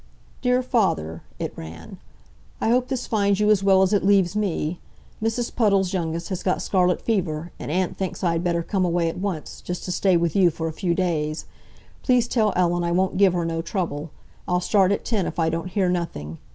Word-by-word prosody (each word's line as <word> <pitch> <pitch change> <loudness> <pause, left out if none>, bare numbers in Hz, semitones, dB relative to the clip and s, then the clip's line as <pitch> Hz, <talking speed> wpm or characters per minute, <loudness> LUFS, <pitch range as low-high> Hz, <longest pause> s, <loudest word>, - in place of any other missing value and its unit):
"DEAR 250 0 +2
FATHER 85 - 0 0.2
(it - - -4
ran)—I 80 - -8
hope 250 +1 +2
this 260 -2 -3
finds 200 -2 +1
you 210 0 +4
as 200 -2 +3
well 190 -1 +5
at 190 +2 +1
it 205 - +2
leaves 195 -2 +3
me. 180 -5 -1 0.4
Mrs. 225 +2 -1
Puddle's 195 -5 +2
youngest 170 -2 -2
has 185 -3 -3
got 185 - 0
scarlet 180 -2 +2
fever, 170 -7 -1
and - - -6
Aunt 180 +3 -1
thinks 190 0 -4
I 175 - +3
had 165 +1 -1
better 170 -1 0
come 190 +2 0
away 170 -1 +1
at 165 - -6
once, 185 -6 -4
just 180 0 -5
to 180 - -4
stay 185 0 +3
with 170 -2 0
you 190 -3 +5
for 165 0 -4
a 160 - -4
few 170 0 -1
days. 160 -4 -1 0.6
Please 250 -2 +3
tell 220 -4 +2
Ellen 175 -1 +2
I 170 - 0
won't 185 +2 +1
give 195 -2 +5
her 175 -1 0
no 165 0 -1
trouble. 165 -3 -3 0.4
I'll 180 0 +2
start 190 +1 +3
at 200 - -1
ten 210 -6 0
if - - -6
I 165 -1 +2
don't 165 +2 -3
hear 190 -1 +1
nothing. 125 - -3
180 Hz, 210 wpm, -23 LUFS, 165-200 Hz, 0.6 s, well